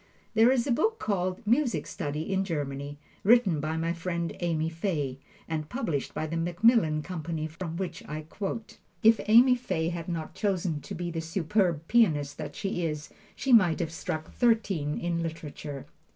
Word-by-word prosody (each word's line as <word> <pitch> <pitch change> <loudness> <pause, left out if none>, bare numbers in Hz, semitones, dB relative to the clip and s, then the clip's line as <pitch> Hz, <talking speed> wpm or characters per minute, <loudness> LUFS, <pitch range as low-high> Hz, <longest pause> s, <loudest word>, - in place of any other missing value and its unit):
There 225 +2 +6
is 255 -2 +2
a 275 - 0
book 440 - +2
called, 185 - -2
"Music 245 +3 +2
Study 150 +6 -3
in 190 0 +2
Germany," 145 -4 -4 0.3
written 205 -7 +5
by 155 +2 -2
my 165 +1 0
friend 170 0 -3
Amy 160 -2 0
Fay, 160 -6 -2 0.3
and 155 -2 -3
published 170 - -2
by - - -1
The 165 +2 -3
Macmillan 170 -2 +3
Company, 165 -3 -4
from 165 +1 -5
which 175 -3 -4
I 155 +1 -4
quote. 200 +7 -5 0.2
If 225 0 +6
Amy 240 +4 +7
Fay 170 -10 -1
had 170 0 -5
not 165 -2 -4
chosen 180 -7 -1
to - - -7
be 175 0 -3
the 165 -1 -3
superb 165 -1 0
pianist 150 -12 +3
that - - -5
she 195 -3 -2
is, 150 -2 -3 0.3
she 265 - +1
might 180 -8 +6
have 165 -2 -2
struck 160 -1 -4
thirteen 200 - +1
in 170 -1 -1
literature. 155 -4 -6
170 Hz, 170 wpm, -28 LUFS, 155-205 Hz, 0.3 s, Amy